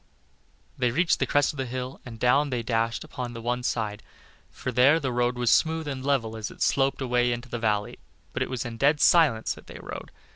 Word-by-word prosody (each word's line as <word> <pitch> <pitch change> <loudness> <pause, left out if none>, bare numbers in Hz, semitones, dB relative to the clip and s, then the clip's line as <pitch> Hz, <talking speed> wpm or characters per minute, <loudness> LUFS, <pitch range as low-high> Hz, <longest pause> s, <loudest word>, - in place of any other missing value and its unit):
They 125 -1 +2
reached 165 +8 +2
the - - +1
crest 145 0 +2
of - - -12
the 130 -1 -2
hill, 130 +2 -5
and 115 -2 -9
down 140 +5 +3
they 125 -3 -2
dashed 115 0 -1
upon 125 -1 -6
the 115 -1 -8
other 120 +1 -1
side; 110 -3 -2 0.5
for 125 - -5
there 130 +6 +5
the 135 -5 -2
road 120 0 0
was 120 -1 +2
smooth 160 -1 +2
and 135 -2 -4
level 130 -6 0
as 110 -1 -4
it - - -4
sloped 135 0 +1
away 125 -1 +2
into 120 +1 -4
the 120 - -4
valley, 105 -2 -1 0.3
but - - -3
it - - 0
was 130 -1 -3
in 115 -1 -6
dead 145 +4 +3
silence 145 -12 +4
that - - -15
they - - -10
rode. - - -8
125 Hz, 225 wpm, -26 LUFS, 115-135 Hz, 0.5 s, there